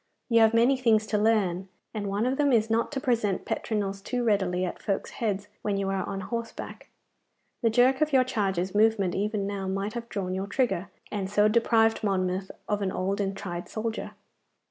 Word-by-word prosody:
You 230 -1 +5
have 225 0 +5
many 245 +4 +4
things 225 -4 +3
to 215 - 0
learn, 195 -4 +1 0.2
and 210 -2 -3
one 200 +3 0
of 260 +2 0
them 285 -1 +3
is 225 -2 +3
not 230 +4 +1
to 270 - -1
present 230 -7 0
petronels 200 -3 -2
too 245 +4 -2
readily 190 -5 +1
at 180 - -6
folk's 195 - -2
heads 205 -3 -2
when 205 -2 -1
you 195 -1 -1
are 195 -1 -1
on 195 -1 -3
horseback. 230 +1 -6 0.7
The 230 - +3
jerk 255 +4 +4
of 305 0 +2
your 265 -2 +5
charger's 195 -7 -1
movement 210 -3 +3
even 205 0 -1
now 195 -1 -3
might 195 +2 -2
have 235 -1 -6
drawn 185 -2 -3
your 190 +1 -3
trigger, 205 -4 0 0.2
and 195 -2 -2
so 210 +1 +4
deprived 225 0 +3
Monmouth 190 -1 0 0.2
of 210 0 0
an 190 -2 0
old 195 +3 -1
and 195 0 -2
tried 175 -3 -5
soldier. 225 0 -4
210 Hz, 195 wpm, -27 LUFS, 195-230 Hz, 0.7 s, You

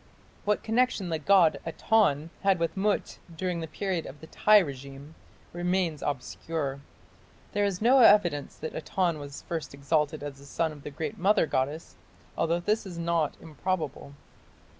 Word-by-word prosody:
What 210 0 +1
connection 225 -4 +1
the 160 -1 -1
god 175 0 +4
Aton 165 -3 +1
had 195 -1 +3
with 165 -1 -1
Mut 200 +1 -1 0.2
during 180 -1 -2
the 160 - -4
period 185 +1 -3
of 145 - -10
the - - -11
Tiy 210 +6 +5
regime 140 +1 -9 0.4
remains 175 -3 0
obscure. 140 +1 -3 0.7
There 205 0 +1
is 200 0 -2
no 260 +3 +6
evidence 175 - +5
that 160 - -6
Aton 170 0 -1
was 145 -1 -8
first 160 -4 -5
exalted 150 +1 0
as 140 -2 -7
the 140 - -14
son 160 +3 -1
of 150 -2 -11
the 150 - -7
Great 145 +1 -5
Mother 195 +2 +4
goddess, 145 +3 -2 0.4
although 165 +1 +1
this 210 +5 0
is 175 -3 -8
not 170 -3 0
improbable. 155 -3 -4
165 Hz, 160 wpm, -28 LUFS, 145-190 Hz, 0.7 s, no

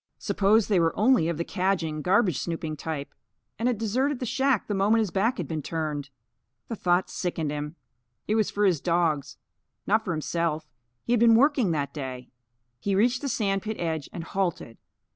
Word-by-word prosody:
Suppose 210 +2 +2
they 200 -4 +3
were 165 -1 +1
only 210 -7 +4
of 170 - -2
the 170 - -1
cadging, 180 -5 -1
garbage 185 - +2
snooping 165 -2 -3
type, 150 -2 -5 0.5
and 230 - +1
had 245 - 0
deserted 255 +6 0
the 250 - -4
shack 265 -1 +1
the 210 - -3
moment 205 +3 +3
his 210 -5 -1
back 225 +6 +1
had - - -3
been 160 -2 -3
turned! 150 -2 -3 0.6
The 230 - -2
thought 180 -2 +1
sickened 165 -4 -3
him. 150 +1 -4 0.5
It 210 - +1
was 220 -2 +2
for 205 0 +1
his 175 -7 +2
dogs, 165 -5 0 0.5
not 215 +2 +2
for 185 - -3
himself, 160 0 -1 0.4
he 240 - 0
had 240 - +3
been 230 0 +6
working 265 -4 +4
that 140 -2 -2
day. 130 -4 -6 0.5
He 200 +8 -1
reached 240 +5 +2
the 280 - -2
sand 195 -5 0
pit 220 +1 -4
edge 160 -4 -2
and 170 - -6
halted. 170 -10 -3
185 Hz, 190 wpm, -26 LUFS, 160-220 Hz, 0.6 s, been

